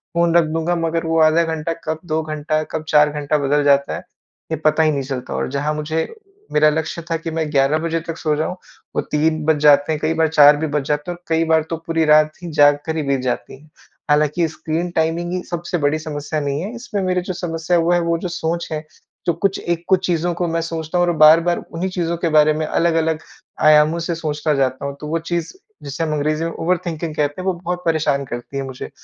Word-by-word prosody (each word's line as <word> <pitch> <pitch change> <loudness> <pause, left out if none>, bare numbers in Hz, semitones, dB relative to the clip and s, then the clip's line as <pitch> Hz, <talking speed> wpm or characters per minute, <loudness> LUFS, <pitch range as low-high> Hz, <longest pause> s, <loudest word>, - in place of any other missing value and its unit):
Phone 170 0 +2
रख 170 - +6
दूँगा 165 +2 0
मगर 165 0 -1
वो 165 0 +1
आधा 160 +2 +5
घंटा 160 +1 -3
कब 155 0 -2
2 160 -1 -1
घंटा, 155 0 -2
कब 155 0 -5
4 150 0 +5
घंटा 150 0 -1
बदल 145 +1 +2
जाता 140 -1 +3
है, - - -5 0.5
ये 160 - 0
पता 155 +1 +4
ही 155 - +3
नहीं 140 -2 -2
चलता। 130 -2 -5
और - - -2
जहाँ 145 +2 -1
मुझे 155 +2 -2 0.5
मेरा 150 0 +5
लक्ष्य 160 +2 -3
था 165 - +2
कि 165 0 -6
मैं 160 -1 -2
ग्यारह 140 +1 +3
बजे 165 0 -1
तक 165 -1 -4
सो 155 -2 0
जाऊँ, 155 +4 -2 0.4
वो - - +2
3 155 +1 +1
बज 160 -1 +3
जाते 145 0 +5
हैं। 155 - -1
कई 155 +1 +1
बार 160 0 +2
4 150 -1 +6
भी 160 +1 -2
बज 150 -1 -1
जाते 150 +4 -1
हैं 175 - -6
और 175 - -33
कई 165 0 +2
बार 160 -1 +3
तो 165 - -2
पूरी 165 -1 +1
रात 155 0 +5
ही 170 - -5
जाग 145 -1 +5
कर 160 0 -2
ही 155 - -1
बीत 140 -1 0
जाती 130 +1 -4
है। 155 - -21 0.4
हालाँकि 150 +3 +2
स्क्रीन 160 +2 -3
टाइमिंग 165 +1 -1
ही 180 - -2
सबसे 175 +1 -3
बड़ी 145 0 +1
समस्या 155 0 -4
नहीं 140 +1 -2
है। 205 +6 -5
इसमें 235 -4 -4
मेरे 185 -1 0
जो 185 +1 -4
समस्या 170 -1 -1
है, 165 - +2
वो 170 - +1
है, 175 - +3
वो 170 0 0
जो 175 - -4
सोच 170 0 -3
है, 155 - -1 0.5
जो 170 - +2
कुछ 195 +4 -1
एक 170 -1 -2
कुछ 190 -1 +3
चीज़ों 175 0 0
को 175 +1 -2
मैं 165 0 -1
सोचता 165 +1 -3
हूँ 175 - +4
और - - +3
बार-बार 165 +3 +6
उन्हीं 175 +3 -2
चीज़ों 170 -2 -2
के 170 0 -1
बारे 155 0 +5
में 155 +1 -2
अलग-अलग 160 -1 +1 0.5
आयामों 155 +2 +5
से 170 0 -2
सोचता 155 -1 -1
जाता 130 0 0
हूँ, 140 0 -4
तो 150 - -5
वो 165 +2 -1
चीज़ 170 0 -3 0.3
जिसे 140 +3 -4
हम 155 -1 -1
अंग्रेजी 155 +2 0
में 165 - -2
ओवरथिंकिंग 165 -2 -2
कहते 145 +3 -1
है, - - -7
वो 190 - +1
बहुत 180 0 -3
परेशान 155 -4 +1
करती 120 +2 -6
है 135 - -2
मुझे 130 0 -7
160 Hz, 240 wpm, -20 LUFS, 150-170 Hz, 0.5 s, रख